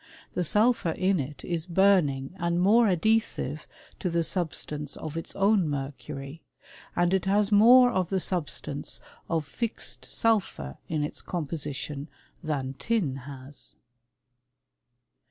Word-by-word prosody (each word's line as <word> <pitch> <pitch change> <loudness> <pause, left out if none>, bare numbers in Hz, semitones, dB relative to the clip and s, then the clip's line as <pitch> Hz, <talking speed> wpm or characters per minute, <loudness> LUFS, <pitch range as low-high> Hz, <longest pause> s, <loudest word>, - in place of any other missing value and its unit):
The 180 - 0
sulphur 210 -1 +3
in 185 +1 +1
it 140 0 -5
is 170 -1 -2
burning 170 -7 +3
and 170 0 0
more 220 +5 +5
adhesive 185 - +1 0.3
to 180 - -1
the 170 0 +1
substance 150 -4 -3
of 155 0 -6
its 165 - -5
own 195 -3 +3
mercury, 140 +1 -5 0.5
and 175 +1 +2
it 190 -1 +1
has 200 +2 +2
more 245 +4 +8
of 185 -6 0
the 190 - +1
substance 170 -8 -2 0.3
of 160 -2 0
fixed 230 +10 -4
sulphur 200 - 0
in 155 -2 0
its 150 - -4
composition 150 -3 -4 0.3
than 140 -4 -2
tin 205 - 0
has. 135 0 -8
170 Hz, 125 wpm, -27 LUFS, 145-195 Hz, 0.5 s, more